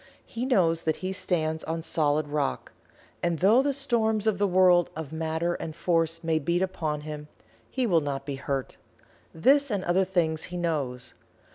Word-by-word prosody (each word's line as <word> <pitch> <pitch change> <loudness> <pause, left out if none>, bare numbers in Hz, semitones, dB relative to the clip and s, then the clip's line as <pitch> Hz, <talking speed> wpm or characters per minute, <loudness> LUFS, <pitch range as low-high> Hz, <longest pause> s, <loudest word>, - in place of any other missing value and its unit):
He 240 +3 -4
knows 165 -10 +3
that 160 -1 0
he 190 - -1
stands 160 -4 -1
on 165 0 -3
solid 150 -2 +1
rock, 145 -1 -2 0.5
and 170 -1 0
though 210 - +5
the 285 +1 +1
storms 230 -6 0
of 215 -3 +1
the 205 - +3
world 180 -2 +4
of 155 -1 -6
matter 160 +2 -1
and 160 -2 -6
force 165 -1 0
may 160 -1 +1
beat 170 +5 0
upon 155 -5 -2
him, 150 0 -7 0.4
he 260 -2 -1
will 170 -7 +3
not 140 -2 -4
be 140 -1 -4
hurt. 135 -1 -3 0.5
This 275 - +3
and 200 -4 -1
other 180 +2 +2
things 170 -4 0
he 180 - -6
knows. 140 -7 -2
165 Hz, 175 wpm, -27 LUFS, 155-190 Hz, 0.5 s, though